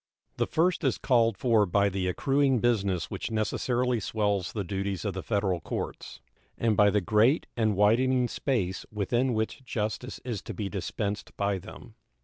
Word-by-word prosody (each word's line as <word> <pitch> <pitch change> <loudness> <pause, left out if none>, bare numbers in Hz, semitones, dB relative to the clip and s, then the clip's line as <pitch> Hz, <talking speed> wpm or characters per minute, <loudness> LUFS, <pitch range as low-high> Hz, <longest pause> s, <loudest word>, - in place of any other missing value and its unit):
The - - +1
first 170 +2 +1
is 135 - +1
called 115 -5 +2
for 115 -5 +3
by 100 +3 +3
the 95 -1 -1
accruing 135 +7 +2
business 100 -7 0
which - - -4
necessarily 120 +2 0
swells 105 -3 -1
the 105 - -3
duties 95 +1 -3
of 100 - -1
the 95 - -4
Federal 100 -4 0
courts, - - -6 0.4
and 115 -2 +1
by 105 0 +5
the 105 0 +2
great 110 - +3
and 110 -3 +1
widening 125 +5 +3
space 110 -9 -1
within 120 +4 0
which 110 +5 -2
justice 120 +1 -3
is 115 -6 -3
to - - -7
be 100 -3 -3
dispensed 100 +2 -4
by 100 -1 0
them. - - -12
105 Hz, 165 wpm, -28 LUFS, 100-120 Hz, 0.4 s, by